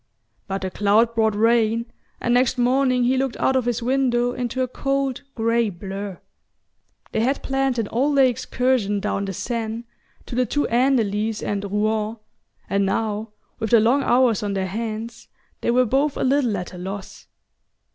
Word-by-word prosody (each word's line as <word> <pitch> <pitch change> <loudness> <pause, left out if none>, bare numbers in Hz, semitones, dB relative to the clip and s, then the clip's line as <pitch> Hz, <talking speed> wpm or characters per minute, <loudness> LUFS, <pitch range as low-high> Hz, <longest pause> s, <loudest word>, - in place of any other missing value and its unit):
But 195 -1 -3
the 185 - -3
cloud 210 +4 +3
brought 220 -2 +2
rain, 230 +1 +2 0.3
and 240 - 0
next 250 +1 +3
morning 255 0 +2
he 255 +2 +2
looked 265 -2 -1
out 265 - +1
of 255 -2 +1
his 240 -1 -1
window 245 -1 +1
into 250 +1 -2
a - - -1
cold 275 0 -1
grey 230 0 +1
blur. 195 +1 -6 0.9
They - - -1
had 260 +5 0
planned 270 -2 0
an 225 -3 -1
all 275 +7 +1
day 270 -2 +6
excursion 245 -4 0
down 200 0 -2
the 195 - -4
Seine, 230 +2 -3 0.4
to - - -9
the 250 0 +1
two 290 +6 0
Andelys 225 -4 +1
and 205 -1 -2
Rouen, 215 +1 0 0.5
and 200 0 +1
now, 210 +2 -1 0.3
with 220 -1 -2
the 230 - +6
long 240 +6 +3
hours 245 -5 +3
on 205 -1 -2
their 190 -1 0
hands, 220 +3 -5 0.3
they - - -1
were 250 +1 +4
both 275 +5 +1
a - - -1
little 255 -5 +2
at 180 0 -6
a 180 - -8
loss... 195 +2 -7
230 Hz, 175 wpm, -22 LUFS, 210-255 Hz, 0.9 s, day